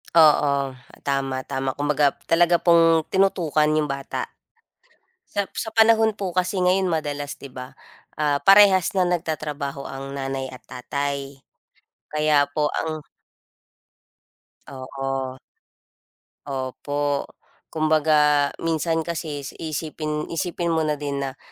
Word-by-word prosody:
Oo, 140 -4 +4 0.3
tama, 135 -1 0
tama. 135 0 -2
Kumbaga, 145 +1 +1 0.2
talaga 170 +1 +4
pong 165 -2 +4
tinutukan 170 -6 +2
yung 155 -1 +1
bata. 135 -1 -4 1.0
Sa 200 -1 -3
sa 220 -1 -5
panahon 225 0 +5
po 200 -2 -4
kasi 185 +1 0
ngayon 185 +1 +3
madalas, 145 -4 -2
di 140 - -8
ba? 125 0 -9 0.4
Ah, 150 -2 +1
parehas 195 +1 +6
na 190 - +2
nagtatrabaho 150 -5 -3
ang 135 0 -7
nanay 135 -1 -3
at 130 - -11
tatay. 140 +1 -4 0.7
Kaya 150 -2 +2
po 150 +1 0
ang 160 -1 -2 1.7
Oo. 135 0 -4 1.1
Opo, 140 +1 -2 0.4
kumbaga 150 -2 +3
minsan 165 0 -1
kasi 155 -4 -4 0.2
iisipin 155 -1 -3
isipin 170 0 -1
mo 160 - +1
na 150 -1 0
din 140 -1 -3
na 135 0 -4
150 Hz, 110 wpm, -23 LUFS, 140-165 Hz, 1.7 s, parehas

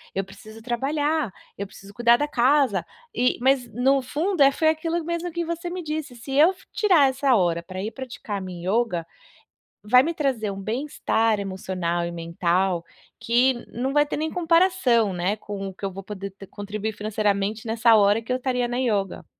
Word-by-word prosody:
Eu 195 - 0
preciso 210 +3 -13
trabalhar, 285 +2 -1 0.2
eu 200 - -4
preciso 195 +1 -14
cuidar 235 +1 +5
da 295 +4 -1
casa 260 -4 +2 0.3
e 250 +1 +1
mas 260 -1 +3
no 265 +4 +3
fundo 315 +7 -1
é 275 0 +7
foi 315 +2 +2
aquilo 330 +2 -1
mesmo 340 +1 -3
que 345 0 -1
você 335 +1 -4
me 360 0 -5
disse, 305 -4 -4
se 240 +3 -9
eu 305 +6 +6
f 380 0 -16
tirar 350 -10 +4
essa 265 0 +2
hora 170 -4 +1
pra 185 +2 -7
ir 215 - -3
praticar 235 -6 -6
minha 180 -2 -7
ioga, 210 -6 0 0.8
vai 250 +5 +6
me 335 +4 -1
trazer 265 -9 -1
um 195 0 -7
bem-estar 225 -1 0
emocional 185 -3 -2
e 170 - -4
mental 170 +1 0 0.3
que 245 +3 +3 0.2
não 255 +3 -2
vai 295 +1 +4
ter 295 - -4
nem 315 +1 -2
comparação, 330 - +3
né, 180 +3 -1
com 205 -2 -6
o 190 - -7
que 190 - -21
eu 195 - -2
vou 195 +1 -7
t - - -42
poder 200 -1 -6 0.2
contribuir 210 +2 -5
financeiramente 210 +1 -1
nessa 230 +1 +4
hora 205 +2 +4
que 230 - -7
eu 255 - +2
estaria 250 -1 -1
na 240 - -2
ioga. 205 -7 -1
235 Hz, 190 wpm, -24 LUFS, 200-290 Hz, 0.8 s, é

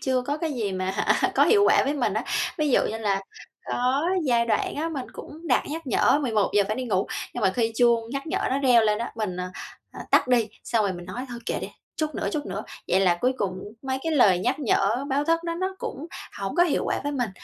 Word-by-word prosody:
chưa 260 -1 +1
có 285 +4 -2
cái 320 -1 -2
gì 220 -7 -2
mà, 185 0 -1
hả, 195 - +1
có - - +5
hiệu 410 -2 +5
quả - - +5
với 280 - 0
mình 270 -4 0
á. - - -1 0.3
Ví 300 -2 +1
dụ - - +5
như 220 - -4
là 200 -3 0 0.5
có 255 +3 +1 0.2
giai 235 -3 +2
đoạn 225 - 0
á, 320 +3 -1
mình 280 -6 -4
cũng 320 +3 -10
đặt - - +3
nhắc 320 +1 -5
nhở 270 - +3
11:00 215 -4 +2
phải 215 +2 -2
đi 255 - -3
ngủ, 195 -5 0 0.3
nhưng 245 - -3
mà 190 - +4
khi 230 -2 +1
chuông 235 -2 +3
nhắc 275 +3 -4
nhở - - -1
nó 265 - +1
reo 250 -4 +5
lên 210 -1 +2
á, 235 - -4
mình, 210 -5 -3
à, 180 - -4 0.4
à, - - -9
tắt 275 - +4
đi, 235 -3 +3 0.2
xong 230 -2 +1
rồi 195 - 0
mình 175 -1 -8
nói 250 - -5
thôi 240 - -6
kệ - - -1
đi, - - -5 0.3
chút 310 -1 -2
nữa, - - -2
chút 300 -2 -2
nữa. 200 +2 -4 0.3
Vậy 190 - +3
là 180 -3 +4
cuối 255 - +2
cùng 185 -5 -2 0.2
mấy 265 -1 -2
cái 325 - -1
lời 205 -11 +5
nhắc 250 +9 0
nhở 240 -1 +1
báo 280 +1 +1
thức 330 +2 +2
đó 335 -1 -2
nó 375 +2 -2
cũng 295 +5 -5 0.3
hổng 195 -1 -3
có 350 - +6
hiệu 345 - +1
quả - - -1
với 290 0 -2
mình. 245 -6 -1
245 Hz, 260 wpm, -25 LUFS, 210-290 Hz, 0.5 s, có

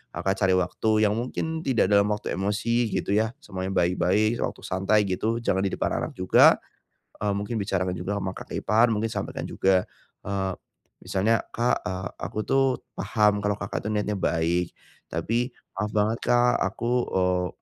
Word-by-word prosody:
Kakak 95 0 -1
cari 95 -2 +3
waktu 110 +4 +1
yang 105 -1 +3
mungkin 160 +6 -3
tidak 120 -7 +2
dalam 100 0 +5
waktu 105 0 -2
emosi 115 +5 0
gitu - - -1
ya 110 +4 +1
semuanya 95 -1 -4
baik-baik 95 +6 +2
sewaktu - - -3
santai 95 +3 +2
gitu 105 +4 -1
jangan 95 - +1
di - - +1
depan - - -1
anak - - -4
juga, 90 0 +6 0.6
eee, 105 -1 0
mungkin 105 +3 -3
bicarakan 95 -2 -1
juga 95 +4 -3
sama 95 -1 -3
kakak - - -6
ipar 110 +4 +4
mungkin 110 +1 -1
sampaikan - - -4
juga, 95 -1 +2 0.4
eee, 95 -1 -2 0.5
misalnya, 110 +4 +1
"Kak," 120 +1 0
eee, 95 0 -3
"aku - - -4
tuh 135 0 +3 0.3
paham 105 -2 +2
kalau 105 0 0
Kakak 100 0 -4
tuh 105 - -1
niatnya 105 0 -1
baik, 85 0 0 0.4
tapi 115 +10 -1 0.2
maaf 105 +2 -2
banget 110 +2 +1
Kak 120 0 +3
aku," 120 0 -2 0.2
eee, 90 -1 +1
105 Hz, 165 wpm, -26 LUFS, 95-110 Hz, 0.6 s, juga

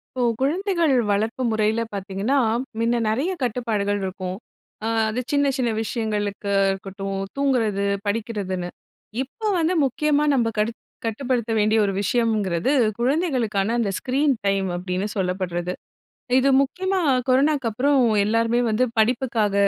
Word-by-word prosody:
இப்போ 250 - -1 0.2
குழந்தைகள் 340 +1 +1 0.2
வளர்ப்பு 220 +5 0
முறையில 220 +1 +1
பாத்தீங்கன்னா, 200 +7 -1 0.4
மின்ன 230 +1 +1
நெறைய 265 - 0
கட்டுப்பாடுகள்ருக்கும். 205 -6 -2 0.5
அ 225 - 0 0.2
அது 230 +3 -2
சின்ன, 285 0 +3
சின்ன 250 -3 0
விஷயங்களுக்கு 210 -3 -2 0.2
இருக்கட்டும் 195 0 -4 0.2
தூங்குறது, 230 -8 +1 0.2
படிக்கிறதுன்னு. 205 -4 -2 0.5
இப்போ 430 - -7
வந்து 335 +2 +1
முக்கியமா 295 +3 +1
நம்ம 235 -4 +2
கடு 215 +2 +1 0.3
கட்டுப்படுத்த 235 0 -1
வேண்டிய 215 +1 +3
ஒரு 195 - -1
விஷயம்ங்கிறது? 215 -2 +1 0.3
குழந்தைகளுக்கான, 245 - +1
அந்த 210 -4 0
ஸ்க்ரீன்டைம். 235 -8 +1
அப்படின்னு 180 +2 -2
சொல்லப்படுது. 180 -2 -2 0.7
இது 270 +1 +3
முக்கியமா 375 +7 -1 0.3
கொரோனாக்கப்புறம், 270 -1 +2 0.2
எல்லாருமே 230 +2 +2
வந்து 220 +4 +2 0.2
படிப்புக்காக 230 -2 +1
225 Hz, 110 wpm, -23 LUFS, 200-265 Hz, 0.7 s, சின்ன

